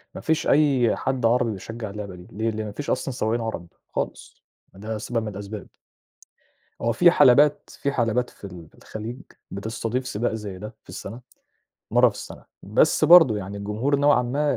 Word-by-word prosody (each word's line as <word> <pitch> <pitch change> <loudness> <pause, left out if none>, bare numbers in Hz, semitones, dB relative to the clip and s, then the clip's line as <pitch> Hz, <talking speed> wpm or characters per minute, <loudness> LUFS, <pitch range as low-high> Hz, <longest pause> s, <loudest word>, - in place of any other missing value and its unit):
ما - - -6
فيش 160 -1 0
أي 140 -6 +3
حد 130 -3 -2
عربي 120 0 +3
بيشجع 110 +2 -6
اللعبة 100 -2 -7
دي، 90 0 -13
ليه؟ 110 +3 -1
لإن 110 0 -4
ما 105 - -6
فيش 145 +8 -6
أصلًا 135 - -1
سواقين 115 -1 -1
عرب 110 -7 -5 0.3
خالص، - - -5 0.3
ده 110 +3 -5
سبب 115 +1 -2
من - - -5
الأسباب. 100 0 -7 1.2
هو 115 - +1
في 175 +8 +6
حلبات 145 -1 +4
في 140 - 0
حلبات 120 -1 0
في - - -17
ال 90 -5 -9
في - - -33
الخليج 115 +4 -8 0.3
بتستضيف 115 +5 -3
سباق 115 -1 -2
زي 105 -4 -6
ده 105 +3 -8
في - - -33
السنة، 100 +5 -8 0.7
مَرّة - - +5
في - - -7
السنة، - - -10 0.2
بس - - +2
برضه 165 -10 +8
يعني 100 0 -6
الجمهور 105 +8 -1
نوعًا 145 -2 +4
ما 140 +4 0
115 Hz, 180 wpm, -24 LUFS, 105-130 Hz, 1.2 s, برضه